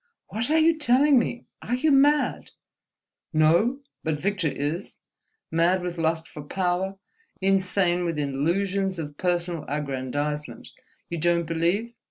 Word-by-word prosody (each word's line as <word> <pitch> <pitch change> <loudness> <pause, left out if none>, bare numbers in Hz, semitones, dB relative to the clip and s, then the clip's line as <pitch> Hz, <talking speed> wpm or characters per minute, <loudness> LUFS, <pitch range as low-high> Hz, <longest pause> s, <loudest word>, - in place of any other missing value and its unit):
"What 225 +5 -3
are 315 - +3
you 320 0 +4
telling 275 0 +5
me? 240 +1 -3 0.2
Are 245 - -1
you 300 +5 +2
mad?" 290 +2 +3 0.8
"No—but 170 - +1
Victor 195 -1 0
is, 150 +6 -3 0.5
mad 175 +3 +2
with 175 -1 -4
lust 160 0 0
for 150 - -9
power, 185 +4 -1 0.4
insane 190 -2 +2
with 165 -2 -2
illusions 185 +7 0
of 150 -3 -6
personal 175 -2 -1
aggrandizement. 145 +1 -3 0.4
You 170 - -4
don't 170 +1 +2
believe? 170 +8 0
175 Hz, 125 wpm, -25 LUFS, 160-205 Hz, 0.8 s, telling